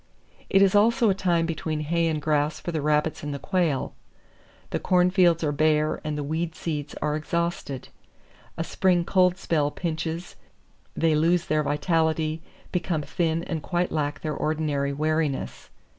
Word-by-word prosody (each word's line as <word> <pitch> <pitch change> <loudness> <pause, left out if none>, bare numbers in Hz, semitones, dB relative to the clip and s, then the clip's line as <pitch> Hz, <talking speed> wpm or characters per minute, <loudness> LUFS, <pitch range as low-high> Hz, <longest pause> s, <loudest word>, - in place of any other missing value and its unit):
It 195 0 +5
is 195 - +4
also 225 +2 +4
a - - +3
time 175 -3 +1
between 160 -1 -3
hay 165 +2 +1
and 155 -2 0
grass 150 0 0
for 175 - -4
the 160 -2 -2
rabbits 150 +1 +1
and 145 -1 -4
the - - -3
quail. 165 -4 0 0.8
The - - -1
corn 180 0 +3
fields 175 -3 +4
are 150 - +1
bare 155 +1 +1
and 150 -1 -3
the 145 - -2
weed 160 +3 -2
seeds 150 -3 -4
are 150 0 0
exhausted. 160 -4 -3 0.7
A 165 - -1
spring 175 +1 +1
cold 180 -1 +3
spell 155 -5 0
pinches, 165 +2 -4 0.6
they 165 -1 +3
lose 165 +3 +2
their 155 0 +1
vitality, 160 +1 0 0.3
become 175 -4 -1
thin 165 +1 -1
and 165 -3 -3
quite 175 +3 -1
lack 145 -1 -2
their 155 -1 -2
ordinary 150 -2 -1
wariness. 155 -1 -2
160 Hz, 160 wpm, -25 LUFS, 150-175 Hz, 0.8 s, It